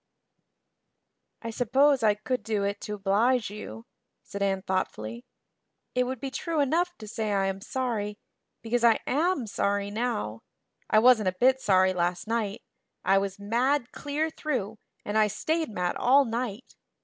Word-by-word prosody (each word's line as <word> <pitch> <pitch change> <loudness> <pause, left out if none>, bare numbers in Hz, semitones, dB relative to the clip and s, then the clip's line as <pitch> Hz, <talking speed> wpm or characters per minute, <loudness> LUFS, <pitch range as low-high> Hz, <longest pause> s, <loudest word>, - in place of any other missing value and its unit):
"I 230 - -4
suppose 265 +4 +3
I 215 -2 +4
could 250 +5 -2
do 215 -2 -1
it 200 0 -2
to 210 - -4
oblige 210 +4 +1
you," 115 - -8 0.4
said 200 - -7
Anne 195 -1 0
thoughtfully. 120 - -3 0.7
"It 250 0 +2
would 260 -1 -4
be 270 +1 -5
true 325 +3 -2
enough 345 +5 +1
to 215 - -10
say 215 -1 -3
I 195 -1 +1
am 195 0 -2
sorry, 215 -4 -2 0.5
because 235 +1 0
I 230 -2 +6
am 320 -1 +1
sorry 200 -1 -1
now. 215 - -2 0.5
I - - +4
wasn't 220 -3 +6
a 185 - -8
bit 260 +1 +4
sorry 185 -3 +4
last 175 +2 -1
night. 225 -1 -2 0.4
I 195 - +5
was 195 -1 -3
mad 235 +6 0
clear 300 +2 -2
through, 225 -10 -3 0.3
and 210 +1 +1
I 215 - +5
stayed 320 - -1
mad 180 -4 -2
all 275 +3 +5
night. 235 0 -4
220 Hz, 160 wpm, -27 LUFS, 200-255 Hz, 0.7 s, I